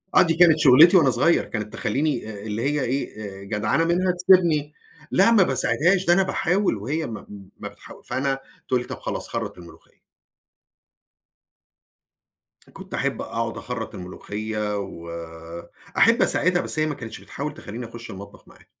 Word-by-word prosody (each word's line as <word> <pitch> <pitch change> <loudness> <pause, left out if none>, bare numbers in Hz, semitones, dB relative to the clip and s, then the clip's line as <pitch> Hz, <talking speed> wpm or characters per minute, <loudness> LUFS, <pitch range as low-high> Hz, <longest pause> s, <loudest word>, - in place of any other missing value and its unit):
آه، - - +8
دي 165 -2 +3
كانت 165 -2 +6
شُغّلتي 155 +6 +7
وأنا 145 -6 +5
صغيّر. 130 +8 +2
كانت 105 -2 -5
تخلّيني 140 -6 -1
آآ 100 -1 -9
اللي 110 +1 -3
هي 145 +2 0
إيه، 120 -4 -3 0.2
آآ، - - -10
جدعنة 105 +10 0
منها 180 +2 +2
تسيبني 175 -5 +3 0.4
لأ 195 +5 +5
ما 210 -4 +6
باساعدهاش 180 +2 +1
ده 175 - +5
أنا 195 +1 +4
باحاول 185 - 0
وهي 150 +10 -3
ما 110 - -8 0.3
ما - - -6
بتحا - - -14
فأنا 135 0 -1 0.3
تقول 125 -1 +1
لي - - -9
"طَب - - -7
خلاص - - -4
خرّط - - -4
الملوخية." 85 -1 -16 2.7
كنت - - -11
أحب - - -1
أقعد 115 0 -3
أخرّط 125 -3 -6
الملوخية، 105 +3 -4
وأحب 85 -2 -2
أساعدها 180 0 +2
بس - - -4
هي 155 - +2
ما 150 -2 -2
كانتش 115 -2 -8
بتحاول 150 +2 -6
تخلّيني 120 -5 -8
أخُش 115 0 -10
المطبخ 100 +1 -11
معاها. - - -19
130 Hz, 155 wpm, -23 LUFS, 105-165 Hz, 2.7 s, آه